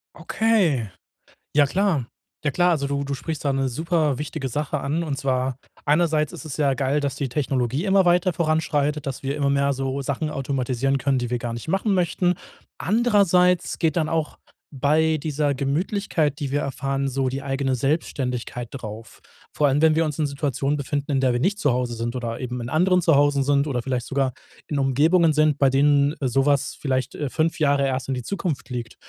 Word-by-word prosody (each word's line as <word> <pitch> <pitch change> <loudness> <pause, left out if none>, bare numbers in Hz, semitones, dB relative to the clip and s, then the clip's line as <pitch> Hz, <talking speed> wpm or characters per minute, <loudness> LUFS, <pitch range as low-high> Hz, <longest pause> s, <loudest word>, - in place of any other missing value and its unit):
Okay. 180 - +1 0.7
Ja 145 -1 +5
klar. 175 - 0 0.4
Ja 145 - +1
klar, 175 +5 +3
also 150 -5 0
du 140 0 -2
du 140 - -4
sprichst 155 +3 -5
da 140 - +2
'ne 135 0 0
super 155 +1 0
wichtige 135 -1 -4
Sache 145 +4 -2
an 150 +4 -1
und 145 -5 -3
zwar 130 -1 -1 0.3
einerseits 155 0 +2
ist - - -9
es 140 -6 -6
ja 140 -2 +2
geil, 135 +2 0
dass 140 -2 -2
die 140 -1 -2
Technologie 130 - -1
immer 195 -2 +3
weiter 180 +1 +3
voranschreitet, 155 -3 0
dass 135 -2 -4
wir 140 +1 -2
immer 140 -2 +1
mehr 140 0 +2
so 135 +1 -2
Sachen 140 +3 -2
automatisieren 135 -2 -1
können, 135 0 +1
die 120 -1 -2
wir 125 - -1
gar 120 0 -4
nicht 115 +5 -7
machen 195 +4 +1
möchten. 180 0 +1 0.4
Andererseits 185 -5 +2
geht 160 -2 +1
dann 160 -2 +1
auch 160 -2 -2 0.3
bei 155 +3 +2
dieser 150 -1 0
Gemütlichkeit, 150 +2 -1
die 140 -2 -3
wir 145 - +1
erfahren, 135 0 -2
so 135 0 -1
die 135 +2 -4
eigene 135 -1 -1
Selbstständigkeit 125 -3 -2
drauf. 110 -3 -9 0.3
Vor 150 - +2
allem, 140 +2 +2
wenn 160 -1 +5
wir 165 - +3
uns 150 -1 -4
in 155 - +1
Situationen 140 0 -1
befinden, 140 +1 -3
in 135 - +2
der 130 -2 +2
wir 120 - 0
nicht 200 +8 +1
zu 145 -10 +2
Hause 125 0 -1
sind 115 +1 -3
oder 115 -2 -4
eben 125 -1 -4
in 120 - -5
anderen 180 +3 +3
Zuhause 145 -3 +3
sind 140 +1 +2
oder 125 -5 -2
vielleicht 125 -2 -2
sogar 135 -1 0 0.4
in 145 - -1
Umgebungen 155 +5 +3
sind, 155 -1 +3
bei 140 - +4
denen 140 +1 +3
so 135 0 +1
was 140 -2 +1
vielleicht, 130 -2 -2
äh, 145 - -2
5 160 +5 0
Jahre 140 -2 +2
erst 130 0 -2
in 135 - 0
die 125 - -4
Zukunft 165 0 -4
liegt. 120 -2 -5
140 Hz, 200 wpm, -23 LUFS, 135-155 Hz, 0.7 s, Ja